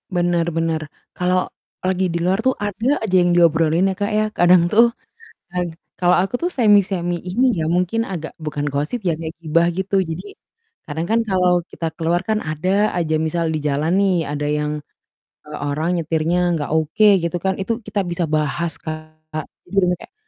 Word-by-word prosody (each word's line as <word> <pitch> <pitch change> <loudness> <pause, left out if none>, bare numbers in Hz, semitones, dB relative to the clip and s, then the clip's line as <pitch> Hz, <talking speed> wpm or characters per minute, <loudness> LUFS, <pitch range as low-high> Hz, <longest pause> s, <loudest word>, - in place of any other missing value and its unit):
Benar 175 -1 +1
benar. 160 -2 -1 0.2
Kalau 180 0 +1 0.4
lagi 185 0 +1
di - - 0
luar 185 +5 +1
tuh 260 +1 +1
ada 220 +7 0
aja 200 -4 -1
yang 175 - +3
diobrolin 165 +1 +4
ya, - - -13
Kak, 205 - +1
ya? 215 0 +2
Kadang 175 0 +5
tuh, 230 +5 +5 0.6
ag 175 -2 -2 0.3
kalau 180 0 +4
aku 195 - -4
tuh - - -1
semi-semi 195 -6 +3
ini 185 +9 0 0.2
ya, 155 - 0
mungkin 225 +6 0
agak 165 -4 -5
bukan 150 -1 -3
gosip 150 +11 -2
ya, 170 - +2
kayak 160 0 -5
gibah 165 +2 +2
gitu. 190 +2 -3
Jadi 170 0 -3 0.6
kadang 160 +2 -3
kan 230 +1 +3
kalau 180 -2 +3 0.2
kita 165 - -4
keluar 170 +2 +1
kan 215 -1 +2
ada 190 +7 +1
aja 160 -2 0
misal 170 +1 -1
di - - 0
jalan 150 +4 0
nih 195 -2 +3 0.2
ada 145 0 -2
yang, 150 0 0 0.7
eee, 150 0 -7
orang 155 +4 -1
nyetirnya 165 +2 0 0.2
enggak 145 -2 -3
oke 160 +7 +3 0.2
gitu 170 +1 -1
kan, 190 - +2
itu 230 +4 -1
kita 205 -1 -1
bisa 175 0 -2
bahas, 155 +3 0
Kak. 155 0 -6 0.2
Jadi 155 -1 -7
bener-bener 180 -2 +3
kayak, - - -13
175 Hz, 180 wpm, -20 LUFS, 160-190 Hz, 0.7 s, Kadang